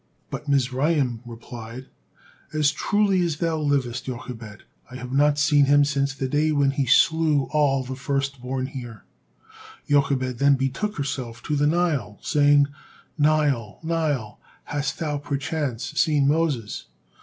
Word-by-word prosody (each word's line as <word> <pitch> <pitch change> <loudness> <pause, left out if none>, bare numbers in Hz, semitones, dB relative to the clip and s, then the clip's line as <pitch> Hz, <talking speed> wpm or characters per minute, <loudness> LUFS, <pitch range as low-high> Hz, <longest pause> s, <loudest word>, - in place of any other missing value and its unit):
But 150 - -6
Mizraim 135 -2 +1
replied, 115 +1 -9 0.7
"As 150 -1 +3
truly 200 +3 +1
as 170 -4 0
thou 165 -1 -1
livest, 140 -5 -1
Jochebed, 120 -4 -7 0.3
I 125 - -10
have 125 0 -7
not 145 +1 +3
seen 145 -1 +4
him 145 +1 +5
since 140 -1 -1
the 135 -1 -2
day 150 +3 +1
when 140 -2 +2
he 135 -1 -1
slew 160 +1 +4
all 140 -3 +2
the 130 +1 -6
firstborn 135 -1 -2
here." 120 -5 -8 0.8
Jochebed 135 -3 +1
then 140 0 +5
betook 135 +11 -2
herself 130 -5 -4
to 150 - -1
the 145 0 +2
Nile, 150 - 0
saying, 145 -1 +4 0.5
"Nile, 145 -8 +1
Nile, 150 -10 -1 0.2
hast 145 -1 -3
thou 150 -3 -2
perchance 145 -3 -3
seen 150 -4 +3
Moses?" 145 -8 0
140 Hz, 135 wpm, -24 LUFS, 130-150 Hz, 0.8 s, him